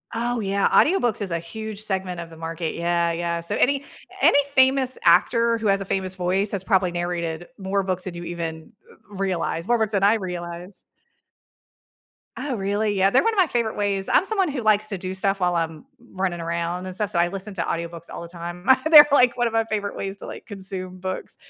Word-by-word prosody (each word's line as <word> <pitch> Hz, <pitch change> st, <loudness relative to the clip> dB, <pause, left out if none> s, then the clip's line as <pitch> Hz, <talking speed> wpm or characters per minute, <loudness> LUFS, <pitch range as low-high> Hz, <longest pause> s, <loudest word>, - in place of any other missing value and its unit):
Oh, 240 Hz, +1 st, -1 dB
yeah, 200 Hz, -1 st, +1 dB
audiobooks 245 Hz, -, +3 dB
is 195 Hz, -3 st, -2 dB
a 170 Hz, -, 0 dB
huge 215 Hz, +5 st, -7 dB
segment 190 Hz, -4 st, -2 dB
of 165 Hz, -, -9 dB
the 165 Hz, -, -13 dB
market, 165 Hz, 0 st, -4 dB
yeah, 170 Hz, 0 st, +1 dB
yeah. 170 Hz, 0 st, -2 dB
So 170 Hz, -, 0 dB
any 280 Hz, +1 st, +2 dB, 0.4 s
any -, -, +6 dB
famous 260 Hz, -1 st, +3 dB
actor 230 Hz, +7 st, +4 dB
who 225 Hz, -1 st, -2 dB
has 195 Hz, 0 st, +2 dB
a 195 Hz, -, -4 dB
famous 190 Hz, -1 st, -1 dB
voice 190 Hz, +3 st, 0 dB
has 195 Hz, -2 st, -3 dB
probably 190 Hz, -3 st, +2 dB
narrated 175 Hz, -1 st, -3 dB
more 195 Hz, 0 st, -1 dB
books 185 Hz, -1 st, -2 dB
than 185 Hz, -, -5 dB
you 175 Hz, 0 st, -7 dB
even 165 Hz, +1 st, -6 dB, 0.2 s
r 205 Hz, -1 st, -15 dB
realize, 185 Hz, -3 st, -2 dB
more 240 Hz, -, +3 dB
books 220 Hz, -2 st, 0 dB
than 200 Hz, -2 st, 0 dB
I 205 Hz, +2 st, +6 dB
realize. 180 Hz, -2 st, -6 dB, 1.6 s
Oh, 285 Hz, -3 st, -3 dB
really? 205 Hz, +1 st, -1 dB
Yeah, 195 Hz, -1 st, +3 dB
they're 255 Hz, -, +3 dB
one 455 Hz, -, +2 dB
of 425 Hz, -, -6 dB
my 370 Hz, -, +4 dB
favorite 235 Hz, -5 st, -1 dB
ways. 200 Hz, -1 st, -1 dB
I'm -, -, +4 dB
someone 390 Hz, -5 st, +1 dB
who 270 Hz, -4 st, -3 dB
likes 215 Hz, -1 st, +3 dB
to 200 Hz, -, -4 dB
do 185 Hz, 0 st, -5 dB
stuff 195 Hz, +1 st, 0 dB
while 180 Hz, -1 st, +1 dB
I'm 165 Hz, +4 st, -3 dB, 0.3 s
running 185 Hz, -2 st, -2 dB
around 170 Hz, +2 st, -3 dB
and 185 Hz, -, -6 dB
stuff, 205 Hz, +2 st, -1 dB
so 205 Hz, -, -2 dB
I 170 Hz, 0 st, +3 dB
listen 195 Hz, +2 st, -3 dB
to 170 Hz, -, -1 dB
audiobooks 170 Hz, 0 st, -5 dB
all -, -, -6 dB
the 170 Hz, -, -7 dB
time. 175 Hz, +1 st, -8 dB, 0.3 s
They're 295 Hz, -2 st, +11 dB
like 250 Hz, -3 st, +5 dB
one 240 Hz, -1 st, +1 dB
of 230 Hz, -, -5 dB
my 225 Hz, 0 st, +2 dB
favorite 210 Hz, -2 st, -3 dB
ways 195 Hz, 0 st, -5 dB
to, -, -, -10 dB
like, -, -, -9 dB
consume 190 Hz, -3 st, -6 dB
books. 185 Hz, 0 st, -5 dB
190 Hz, 220 wpm, -23 LUFS, 175-220 Hz, 1.6 s, They're